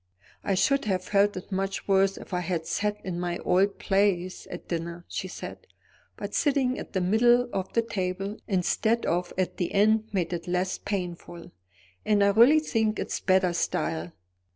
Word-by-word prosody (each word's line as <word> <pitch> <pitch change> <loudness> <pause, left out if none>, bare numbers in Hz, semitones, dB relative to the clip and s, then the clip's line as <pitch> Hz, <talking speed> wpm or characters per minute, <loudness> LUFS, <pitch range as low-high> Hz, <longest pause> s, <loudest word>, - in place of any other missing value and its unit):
"I 195 - +1
should 275 +7 +2
have 185 -3 0
felt 200 +1 +2
it 185 - -8
much 195 +1 -2
worse 195 0 +3
if - - -10
I 180 - +1
had 170 -2 -2
sat 210 +3 -1
in 175 -2 -3
my 175 -1 -2
old 195 +2 +2
place 195 -2 0
at 175 - -8
dinner," 170 0 -4
she 190 - -4
said; - - -9 0.5
"but - - -6
sitting 270 -4 +1
at - - -9
the 190 - 0
middle 240 +6 +4
of 190 -1 -3
the 230 - +2
table 195 -1 -3
instead 220 +4 +1
of 175 +1 -1
at 185 -1 -1
the 175 - -1
end 215 +2 +3
made 180 -3 -1
it 170 0 -5
less 180 +1 -1
painful. 175 -3 -5 0.5
And 205 -1 +3
I 200 - +5
really 235 +9 +6
think 220 -7 0
it's - - -3
better 185 -2 +2
style. 170 0 -2
190 Hz, 175 wpm, -27 LUFS, 180-210 Hz, 0.5 s, really